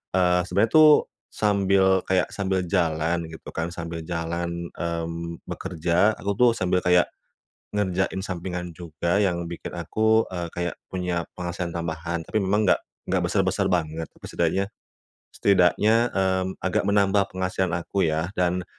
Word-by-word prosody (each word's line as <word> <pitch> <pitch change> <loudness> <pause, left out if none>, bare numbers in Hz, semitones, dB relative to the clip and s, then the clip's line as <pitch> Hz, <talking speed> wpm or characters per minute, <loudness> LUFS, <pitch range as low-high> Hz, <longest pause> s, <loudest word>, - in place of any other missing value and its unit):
eee, 90 -1 +4
sebenarnya 100 +6 +2
tuh 155 -1 +6 0.2
sambil 100 -2 +3
kayak, 95 +1 +1
sambil 95 -2 -1
jalan 85 -1 0
gitu 80 0 -10
kan, 85 +1 -4
sambil 85 -1 -5
jalan, 85 0 -3
mmm, 85 0 -4
bekerja, 85 +6 0
aku 100 - -3
tuh 125 -1 +7
sambil 90 -2 +1
kayak 90 -1 +3 0.7
ngerjain 95 -1 0
sampingan 90 -2 -4
juga 85 +3 -1
yang 90 -4 +1
bikin 85 +1 -7
aku, 110 +6 +2
eee, 85 -2 -3
kayak 85 0 -2
punya 90 -2 -2
penghasilan 85 0 -3
tambahan. 85 0 -3
Tapi 110 - -1
memang 100 +2 +1
nggak 95 - +3 0.3
nggak 95 -2 +2
besar-besar 95 +1 +1
banget, 80 -3 -1 0.2
setidaknya 95 +4 -1 0.6
setidaknya, 100 +3 +3 0.2
mmm, 95 -1 0
agak 95 +2 0
menambah 100 -1 +3
penghasilan 95 -1 -1
aku 85 +3 -3
ya. 80 +4 -1
Dan 90 -1 0
90 Hz, 135 wpm, -25 LUFS, 85-95 Hz, 0.7 s, tuh